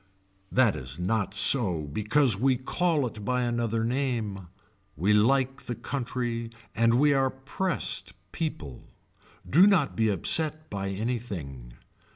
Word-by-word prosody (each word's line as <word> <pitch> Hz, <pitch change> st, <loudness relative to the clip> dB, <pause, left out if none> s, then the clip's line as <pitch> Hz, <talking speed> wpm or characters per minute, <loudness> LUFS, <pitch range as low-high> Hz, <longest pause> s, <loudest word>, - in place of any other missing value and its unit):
That 125 Hz, -5 st, +3 dB
is 65 Hz, -1 st, -6 dB
not 100 Hz, +2 st, -1 dB
so 95 Hz, -, +3 dB
because 105 Hz, -, +1 dB
we 130 Hz, +5 st, +2 dB
call 155 Hz, +3 st, 0 dB
it 110 Hz, -3 st, -6 dB
by 125 Hz, +3 st, 0 dB
another 120 Hz, -2 st, -1 dB
name. 115 Hz, -7 st, -2 dB, 0.5 s
We 95 Hz, +7 st, +2 dB
like 135 Hz, +5 st, +2 dB
the 120 Hz, -, -3 dB
country 120 Hz, -3 st, -3 dB, 0.2 s
and 115 Hz, +1 st, +3 dB
we 145 Hz, +3 st, +4 dB
are 135 Hz, -1 st, +2 dB
pressed 130 Hz, -, -2 dB, 0.2 s
people. 80 Hz, -, -5 dB, 0.6 s
Do 180 Hz, +8 st, +6 dB
not 180 Hz, -9 st, +2 dB
be 110 Hz, -1 st, +2 dB
upset 155 Hz, -, -1 dB
by 100 Hz, -1 st, -3 dB
anything. 95 Hz, -, -5 dB
115 Hz, 130 wpm, -27 LUFS, 100-135 Hz, 0.6 s, Do